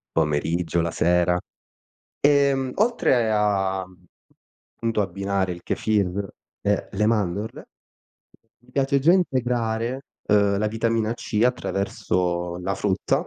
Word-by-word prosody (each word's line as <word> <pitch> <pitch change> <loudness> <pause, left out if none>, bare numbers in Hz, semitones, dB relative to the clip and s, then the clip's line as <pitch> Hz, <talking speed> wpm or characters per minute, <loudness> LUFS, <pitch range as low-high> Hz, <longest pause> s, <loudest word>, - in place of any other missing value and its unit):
pomeriggio, 80 +2 +1
la 85 0 -1
sera. 90 +1 +2 0.8
Ehm, 140 -2 +3
oltre 165 - +2
a 95 -3 +1 0.9
punto 115 -2 -1
abbinare 100 0 -1
il 85 - -9
Kefir 100 -2 0 0.3
e - - 0
le 105 +2 0
mandorle, 105 -1 -1 0.9
mi 125 +1 -24
piace 140 0 +2
già 160 +6 +5
integrare, 125 -6 0 0.2
ehm, 100 -1 +3
la 105 - +1
vitamina 115 +1 0
C 105 -2 -3
attraverso 90 -7 -1
la 95 +2 -2
frutta. 95 -2 0
105 Hz, 110 wpm, -24 LUFS, 90-120 Hz, 0.9 s, già